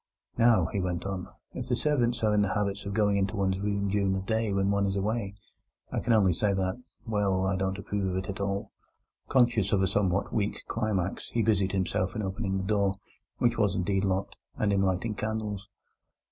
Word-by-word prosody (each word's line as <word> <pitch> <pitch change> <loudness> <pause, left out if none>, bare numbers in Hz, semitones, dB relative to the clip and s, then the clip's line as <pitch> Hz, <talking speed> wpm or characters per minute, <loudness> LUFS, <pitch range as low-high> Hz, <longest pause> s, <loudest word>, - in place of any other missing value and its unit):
"Now," 115 -6 +5
he 100 - 0
went 90 -1 -2
on, 95 -2 -3 0.3
"if - - -5
the - - +3
servants 120 -6 +1
are 105 -1 +3
in 105 - +4
the 100 -2 0
habit 100 -1 -1
of 100 - -3
going 105 -2 +3
into 100 +2 0
one's 95 -2 0
room 100 0 -1
during 100 -1 +1
the 95 - -1
day 110 +1 0
when 100 0 +1
one 100 0 +2
is 95 - -1
away, 100 0 -1 0.6
I - - 0
can - - -1
only 100 -5 +5
say 100 +3 +1
that—well, 100 -1 -1
that 95 - +1
I 95 - +1
don't 95 +1 -1
approve 100 -1 -2
of 90 - -1
it 95 0 -3
at 100 - -5
all." 100 0 -2 0.6
Conscious 120 -6 +3
of 95 -2 +3
a - - +3
somewhat 100 -1 0
weak 105 -2 -1
climax, 105 -5 -2
he 115 - 0
busied 100 -4 +2
himself 95 -1 0
in 110 - -2
opening 95 0 -2
the 95 - -2
door 100 -1 +1 0.4
(which 120 -1 +1
was 105 -3 +2
indeed 95 +1 0
locked) 95 0 -1 0.2
and 105 -2 +1
in 100 - +2
lighting 95 +3 0
candles. 105 -1 -3
100 Hz, 210 wpm, -28 LUFS, 95-105 Hz, 0.6 s, Now